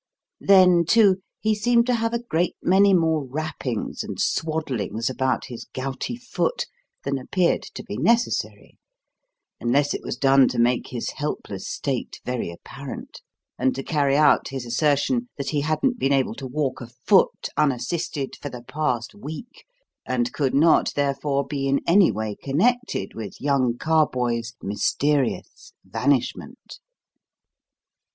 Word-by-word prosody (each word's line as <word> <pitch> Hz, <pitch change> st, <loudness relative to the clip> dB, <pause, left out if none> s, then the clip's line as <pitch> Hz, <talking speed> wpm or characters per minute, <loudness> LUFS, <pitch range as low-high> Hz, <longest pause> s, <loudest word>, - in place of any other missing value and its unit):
Then, 185 Hz, -3 st, +6 dB
too, 195 Hz, +1 st, +4 dB, 0.2 s
he 220 Hz, 0 st, +2 dB
seemed 235 Hz, +2 st, +3 dB
to 250 Hz, -, +1 dB
have 230 Hz, -1 st, 0 dB
a 235 Hz, 0 st, -2 dB
great 175 Hz, -6 st, 0 dB
many 195 Hz, +2 st, +5 dB
more 160 Hz, -4 st, +2 dB
wrappings 135 Hz, -4 st, -4 dB
and -, -, -7 dB
swaddlings 130 Hz, -, -1 dB
about 130 Hz, 0 st, -1 dB
his 120 Hz, -3 st, -8 dB
gouty 135 Hz, -, -4 dB
foot 260 Hz, -, -2 dB, 0.4 s
than 140 Hz, -1 st, -1 dB
appeared 175 Hz, +7 st, +1 dB
to -, -, -6 dB
be -, -, -6 dB
necessary 235 Hz, +1 st, 0 dB, 0.8 s
unless 140 Hz, +4 st, +1 dB
it -, -, -4 dB
was -, -, -5 dB
done 135 Hz, -1 st, +5 dB
to 125 Hz, -, -3 dB
make 120 Hz, +1 st, +2 dB
his 120 Hz, -2 st, -4 dB
helpless 120 Hz, -9 st, -5 dB
state 135 Hz, -4 st, -3 dB
very 125 Hz, -7 st, -2 dB
apparent, 135 Hz, +10 st, -9 dB, 0.4 s
and 130 Hz, -, +1 dB
to 135 Hz, -, -4 dB
carry 140 Hz, -3 st, +1 dB
out 150 Hz, -1 st, +4 dB
his 135 Hz, -2 st, -5 dB
assertion 150 Hz, -, +1 dB
that 140 Hz, -, -3 dB
he 145 Hz, -2 st, 0 dB
hadn't 195 Hz, -, 0 dB
been 135 Hz, -, +2 dB
able 135 Hz, -4 st, +1 dB
to 130 Hz, +3 st, -7 dB
walk 135 Hz, 0 st, -2 dB
a 120 Hz, -, -7 dB
foot 125 Hz, -, +2 dB
unassisted 140 Hz, +1 st, -1 dB
for 145 Hz, -, -4 dB
the 125 Hz, -2 st, -9 dB
past 130 Hz, -3 st, -2 dB
week, 205 Hz, -, -9 dB, 0.4 s
and 125 Hz, -1 st, -1 dB
could 135 Hz, -3 st, 0 dB
not, 160 Hz, +3 st, +4 dB
therefore, 140 Hz, 0 st, 0 dB
be 140 Hz, -2 st, -3 dB
in 140 Hz, 0 st, +2 dB
any 180 Hz, -, +5 dB
way 110 Hz, 0 st, -3 dB
connected 245 Hz, -, 0 dB
with 110 Hz, -4 st, -7 dB
young 130 Hz, -4 st, +1 dB
Carboys' 125 Hz, -7 st, 0 dB
mysterious 135 Hz, +7 st, -1 dB
vanishment. 130 Hz, -2 st, -2 dB
140 Hz, 145 wpm, -24 LUFS, 130-170 Hz, 0.8 s, Then